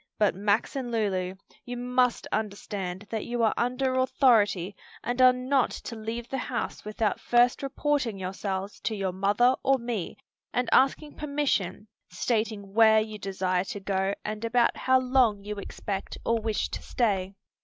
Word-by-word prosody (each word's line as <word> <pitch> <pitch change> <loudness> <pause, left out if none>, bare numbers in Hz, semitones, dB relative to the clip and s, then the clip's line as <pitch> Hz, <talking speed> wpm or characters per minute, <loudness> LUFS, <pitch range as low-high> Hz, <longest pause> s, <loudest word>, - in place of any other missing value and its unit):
But, 210 -2 +3
Max 205 +6 0
and 260 -3 -3
Lulu, 190 -5 -1 0.3
you 245 0 -6
must 250 0 +1
understand 200 -3 -3
that 220 -2 -2
you 240 -1 -1
are 220 - +3
under 255 +2 0
authority 210 -8 +3 0.3
and 245 +1 -1
are 255 0 +9
not 255 +1 +1
to 230 - -7
leave 225 +2 -5
the 270 - -3
house - - -4
without 215 0 -1
first 240 0 +3
reporting 275 -5 -1
yourselves 190 +1 -4
to 220 - -2
your 195 -2 -1
mother 205 +7 +3
or 270 0 +3
me 235 -7 -4 0.4
and 250 0 0
asking 280 +3 +3
permission, 280 -10 -1 0.2
stating 210 +1 -2
where 220 0 +6
you 215 -1 -4
desire 185 -2 -1
to 210 -1 -5
go 195 0 -1
and 215 +1 -4
about 235 +1 +2
how 260 0 +3
long 250 -6 +2
you 210 0 -5
expect 195 0 -5
or 230 0 +2
wish 220 -1 -1
to - - -5
stay." 195 -5 -1
220 Hz, 160 wpm, -27 LUFS, 200-250 Hz, 0.4 s, are